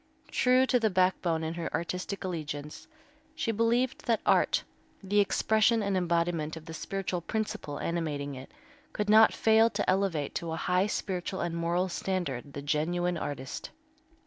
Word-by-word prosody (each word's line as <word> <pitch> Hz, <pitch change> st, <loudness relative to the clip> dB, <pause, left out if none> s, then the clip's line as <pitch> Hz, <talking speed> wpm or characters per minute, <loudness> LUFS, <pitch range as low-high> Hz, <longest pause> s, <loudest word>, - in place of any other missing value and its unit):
True 255 Hz, +1 st, +4 dB
to 255 Hz, -1 st, +2 dB
the 220 Hz, -2 st, +2 dB
backbone 185 Hz, -3 st, +1 dB
in 160 Hz, +1 st, -2 dB
her 170 Hz, -1 st, -4 dB
artistic 180 Hz, +4 st, -3 dB
allegiance, 150 Hz, -5 st, -5 dB, 0.5 s
she 230 Hz, -, -1 dB
believed 235 Hz, +4 st, 0 dB
that 230 Hz, -2 st, +3 dB
art, -, -, +3 dB, 0.4 s
the 205 Hz, +2 st, +2 dB
expression 220 Hz, +2 st, +3 dB
and 200 Hz, -1 st, 0 dB
embodiment 170 Hz, -3 st, 0 dB
of 160 Hz, -, -11 dB
the 165 Hz, -, -8 dB
spiritual 185 Hz, +1 st, -3 dB
principle 170 Hz, -7 st, -3 dB
animating 150 Hz, -4 st, -2 dB
it, 130 Hz, 0 st, -9 dB, 0.4 s
could 210 Hz, 0 st, 0 dB
not 220 Hz, +1 st, +8 dB
fail 225 Hz, +1 st, +4 dB
to -, -, -2 dB
elevate 185 Hz, -6 st, +1 dB
to 165 Hz, -1 st, -3 dB
a -, -, -1 dB
high 180 Hz, +4 st, +1 dB
spiritual 190 Hz, -2 st, -3 dB
and 170 Hz, -1 st, -2 dB
moral 170 Hz, +2 st, 0 dB
standard 170 Hz, -8 st, -3 dB
the 140 Hz, -, -6 dB
genuine 175 Hz, +4 st, 0 dB
artist. 140 Hz, -5 st, -5 dB
180 Hz, 155 wpm, -29 LUFS, 160-205 Hz, 0.5 s, not